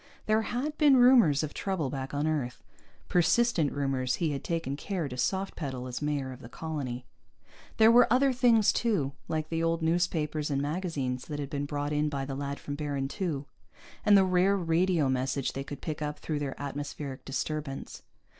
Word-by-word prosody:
There 215 Hz, +1 st, +3 dB
had 275 Hz, +7 st, -3 dB
been 290 Hz, -4 st, +6 dB
rumors 240 Hz, -, +6 dB
of 150 Hz, -, -4 dB
trouble 175 Hz, -9 st, -2 dB
back 135 Hz, -1 st, -4 dB
on 145 Hz, +1 st, -1 dB
Earth, 140 Hz, -6 st, -2 dB, 0.4 s
persistent 180 Hz, -, +3 dB
rumors 135 Hz, -3 st, 0 dB
he 165 Hz, -3 st, 0 dB
had 140 Hz, -, -4 dB
taken 165 Hz, -5 st, -2 dB
care 175 Hz, +1 st, -3 dB
to 125 Hz, -, -6 dB
soft 190 Hz, +10 st, -1 dB
pedal, 130 Hz, -5 st, -4 dB
as 125 Hz, +1 st, -5 dB
mayor 145 Hz, -3 st, -1 dB
of 130 Hz, +1 st, -10 dB
the 115 Hz, -, -10 dB
colony. 130 Hz, -5 st, -5 dB, 0.7 s
There 220 Hz, +1 st, +7 dB
were 240 Hz, -1 st, +6 dB
other 265 Hz, +2 st, +4 dB
things, 235 Hz, -4 st, +4 dB
too, 200 Hz, -, 0 dB, 0.2 s
like 155 Hz, -1 st, -2 dB
the 165 Hz, 0 st, -1 dB
old 165 Hz, 0 st, 0 dB
newspapers 160 Hz, -3 st, 0 dB
and 140 Hz, -1 st, 0 dB
magazines 145 Hz, -5 st, -2 dB
that 150 Hz, -, -5 dB
had 145 Hz, -1 st, -5 dB
been 145 Hz, 0 st, -2 dB
brought 145 Hz, 0 st, -2 dB
in 150 Hz, 0 st, +1 dB
by 140 Hz, -2 st, -3 dB
the 135 Hz, -, -5 dB
lad 140 Hz, +1 st, -4 dB
from 145 Hz, -, -6 dB
Baron 140 Hz, -2 st, -3 dB
II, 150 Hz, -7 st, -1 dB, 0.6 s
and 205 Hz, -1 st, +7 dB
the 190 Hz, -, +5 dB
rare 185 Hz, +2 st, +3 dB
radio 170 Hz, -2 st, +2 dB
message 130 Hz, +1 st, -1 dB
they 135 Hz, -, -4 dB
could 140 Hz, 0 st, -8 dB
pick 155 Hz, -2 st, -4 dB
up 150 Hz, 0 st, -3 dB
through 155 Hz, -2 st, -3 dB
their 140 Hz, -2 st, -4 dB
atmospheric 145 Hz, -1 st, -5 dB
disturbance. 145 Hz, 0 st, -4 dB
150 Hz, 190 wpm, -29 LUFS, 140-180 Hz, 0.7 s, There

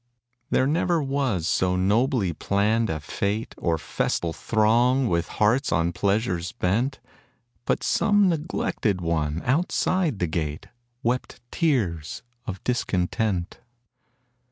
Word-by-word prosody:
There 130 Hz, -, +3 dB
never 165 Hz, +4 st, +1 dB
was 135 Hz, -, 0 dB
so 90 Hz, -1 st, +1 dB
nobly 105 Hz, -, +2 dB
planned 105 Hz, +7 st, +1 dB
a -, -, 0 dB
fête, 100 Hz, +8 st, -3 dB
Or 85 Hz, -2 st, +1 dB
festal 80 Hz, +1 st, -2 dB
throng 120 Hz, +6 st, +2 dB
with 85 Hz, -1 st, 0 dB
hearts 115 Hz, +6 st, +2 dB
on 85 Hz, 0 st, +1 dB
pleasure 100 Hz, 0 st, 0 dB, 0.2 s
bent, 120 Hz, +9 st, 0 dB, 0.7 s
But -, -, 0 dB
some 205 Hz, -2 st, +3 dB
neglected 150 Hz, -, -1 dB
one 80 Hz, -2 st, -1 dB
outside 165 Hz, -, +1 dB
the 90 Hz, -, 0 dB
gate 80 Hz, +1 st, -3 dB, 0.4 s
Wept 125 Hz, +2 st, -1 dB
tears 105 Hz, -, 0 dB, 0.2 s
of 95 Hz, -3 st, -5 dB
discontent. 95 Hz, -5 st, -1 dB
105 Hz, 110 wpm, -25 LUFS, 90-130 Hz, 0.7 s, There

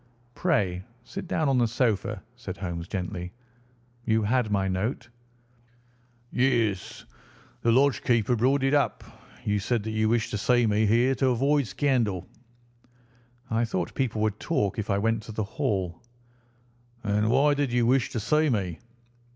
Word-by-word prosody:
"Pray 100 Hz, -, 0 dB, 0.2 s
sit 195 Hz, +5 st, -7 dB
down 160 Hz, -3 st, 0 dB
on 135 Hz, -2 st, +3 dB
the 120 Hz, -, +3 dB
sofa," 110 Hz, -4 st, -1 dB
said 115 Hz, -7 st, -7 dB
Holmes 85 Hz, -2 st, -5 dB
gently. 90 Hz, -1 st, -4 dB, 0.7 s
"You 110 Hz, -2 st, +1 dB
had 120 Hz, +1 st, +1 dB
my 100 Hz, -2 st, +1 dB
note?" 105 Hz, +7 st, -2 dB, 1.2 s
"Yes, 115 Hz, -7 st, 0 dB, 0.6 s
the 115 Hz, -, +3 dB
lodge 135 Hz, +3 st, +3 dB
keeper 120 Hz, 0 st, +2 dB
brought 130 Hz, +4 st, +2 dB
it 135 Hz, +1 st, +2 dB
up. 145 Hz, -2 st, +1 dB, 0.4 s
You 105 Hz, 0 st, +1 dB
said 110 Hz, +2 st, -1 dB
that 110 Hz, -, -4 dB
you 110 Hz, 0 st, +1 dB
wished 115 Hz, 0 st, +1 dB
to 105 Hz, -, -2 dB
see 120 Hz, +2 st, +3 dB
me 105 Hz, 0 st, +2 dB
here 120 Hz, +5 st, +3 dB
to 135 Hz, 0 st, +1 dB
avoid 135 Hz, +2 st, +2 dB
scandal." 105 Hz, -4 st, 0 dB, 1.3 s
"I 115 Hz, +1 st, +2 dB
thought 95 Hz, -7 st, -2 dB
people 115 Hz, -5 st, -1 dB
would 110 Hz, -1 st, -1 dB
talk 105 Hz, -, -1 dB
if 110 Hz, -, -4 dB
I 100 Hz, -, +2 dB
went 115 Hz, +2 st, +1 dB
to 110 Hz, -, -9 dB
the 110 Hz, -, -1 dB
Hall." 95 Hz, -4 st, -2 dB, 1.0 s
"And 105 Hz, +1 st, +1 dB
why 145 Hz, +5 st, +4 dB
did 140 Hz, -3 st, -1 dB
you 120 Hz, -1 st, +2 dB
wish 125 Hz, +1 st, +2 dB
to 115 Hz, -, -3 dB
see 150 Hz, +8 st, +2 dB
me?" 95 Hz, -, -1 dB
115 Hz, 160 wpm, -26 LUFS, 100-130 Hz, 1.3 s, why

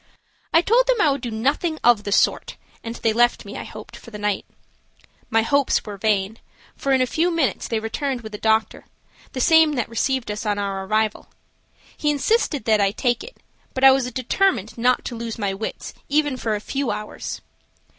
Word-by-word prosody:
I 330 Hz, -, +5 dB
told -, -, +3 dB
them -, -, +2 dB
I 305 Hz, -8 st, +4 dB
would 275 Hz, -1 st, -2 dB
do 245 Hz, -, -4 dB
nothing 280 Hz, +9 st, -1 dB
of 235 Hz, -4 st, +4 dB
the 205 Hz, -, -3 dB
sort -, -, +1 dB, 0.3 s
and 230 Hz, 0 st, -5 dB
they 225 Hz, -2 st, 0 dB
left 240 Hz, +2 st, +2 dB
me, -, -, -8 dB
I -, -, -5 dB
hoped, -, -, -10 dB
for -, -, -13 dB
the 210 Hz, -, -8 dB
night. 205 Hz, -1 st, -2 dB, 0.8 s
My 225 Hz, 0 st, +3 dB
hopes 280 Hz, +3 st, +1 dB
were 210 Hz, -2 st, -6 dB
vain, 205 Hz, +1 st, 0 dB, 0.4 s
for 275 Hz, -, -2 dB
in 260 Hz, -1 st, +4 dB
a -, -, +1 dB
few 325 Hz, +7 st, +1 dB
minutes 320 Hz, -, 0 dB
they 225 Hz, -, -1 dB
returned 250 Hz, +4 st, -3 dB
with 220 Hz, -1 st, -10 dB
a 210 Hz, -, -6 dB
doctor, 220 Hz, 0 st, +1 dB, 0.5 s
the 260 Hz, -, -4 dB
same 320 Hz, +2 st, +5 dB
that 245 Hz, -5 st, -1 dB
received 245 Hz, 0 st, -1 dB
us 210 Hz, -, -5 dB
on 210 Hz, -2 st, -1 dB
our 195 Hz, -1 st, -3 dB
arrival. 215 Hz, +1 st, 0 dB, 0.7 s
He 295 Hz, -, -1 dB
insisted 295 Hz, -, +1 dB
that 215 Hz, -2 st, +3 dB
I 200 Hz, -, +3 dB
take 245 Hz, -, -1 dB
it, -, -, -12 dB, 0.4 s
but 260 Hz, -, -2 dB
I 270 Hz, -, +10 dB
was 265 Hz, -2 st, +1 dB
determined 255 Hz, -, 0 dB
not 250 Hz, +1 st, +1 dB
to 240 Hz, -, -4 dB
lose 230 Hz, -1 st, -5 dB
my 200 Hz, -3 st, -1 dB
wits 205 Hz, +3 st, -6 dB, 0.2 s
even 290 Hz, -1 st, +1 dB
for 225 Hz, -4 st, -2 dB
a -, -, -3 dB
few 270 Hz, +2 st, -2 dB
hours. 210 Hz, 0 st, -5 dB
240 Hz, 205 wpm, -22 LUFS, 215-280 Hz, 0.8 s, I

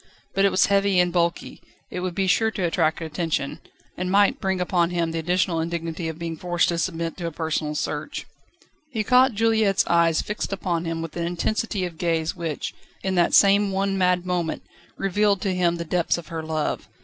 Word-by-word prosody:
But 195 Hz, 0 st, +3 dB
it -, -, +5 dB
was 185 Hz, -, +3 dB
heavy 200 Hz, -1 st, +3 dB
and 175 Hz, -1 st, +2 dB
bulky; 170 Hz, -1 st, -1 dB, 0.3 s
it -, -, -4 dB
would 180 Hz, -1 st, -3 dB
be 195 Hz, -, +1 dB
sure 220 Hz, +4 st, +3 dB
to 210 Hz, -4 st, -4 dB
attract 165 Hz, -1 st, +1 dB
attention, 160 Hz, -3 st, -2 dB, 0.4 s
and 180 Hz, 0 st, -3 dB
might 200 Hz, +1 st, +3 dB
bring 190 Hz, -2 st, 0 dB
upon 175 Hz, -1 st, +1 dB
him 170 Hz, -2 st, -1 dB
the 165 Hz, -, -2 dB
additional 175 Hz, 0 st, +1 dB
indignity 165 Hz, 0 st, -3 dB
of 160 Hz, -, -6 dB
being 165 Hz, -1 st, -5 dB
forced 175 Hz, +1 st, +1 dB
to 170 Hz, -1 st, -1 dB
submit 165 Hz, -2 st, -2 dB
to 175 Hz, -2 st, -3 dB
a -, -, -4 dB
personal 155 Hz, -1 st, -2 dB
search. 150 Hz, -, -3 dB, 0.6 s
He 225 Hz, -6 st, -2 dB
caught 255 Hz, +3 st, +5 dB
Juliette's 220 Hz, -2 st, +3 dB
eyes 170 Hz, -1 st, +3 dB
fixed 210 Hz, 0 st, -4 dB
upon 175 Hz, -4 st, -2 dB
him 165 Hz, 0 st, -3 dB
with 165 Hz, -, -7 dB
an 170 Hz, 0 st, -1 dB
intensity 195 Hz, +3 st, -1 dB
of 170 Hz, -3 st, -8 dB
gaze 165 Hz, -2 st, 0 dB
which, 165 Hz, -4 st, -4 dB, 0.3 s
in 190 Hz, -, 0 dB
that 175 Hz, -2 st, +3 dB
same 200 Hz, 0 st, +5 dB
one 195 Hz, 0 st, 0 dB
mad 180 Hz, -1 st, +2 dB
moment, 175 Hz, -3 st, -2 dB, 0.3 s
revealed 200 Hz, +1 st, +2 dB
to 195 Hz, -, 0 dB
him 175 Hz, -2 st, +2 dB
the 170 Hz, 0 st, -5 dB
depths 175 Hz, +1 st, +1 dB
of 170 Hz, -, -9 dB
her 165 Hz, -1 st, -4 dB
love. 155 Hz, -1 st, -2 dB
175 Hz, 200 wpm, -24 LUFS, 165-195 Hz, 0.6 s, it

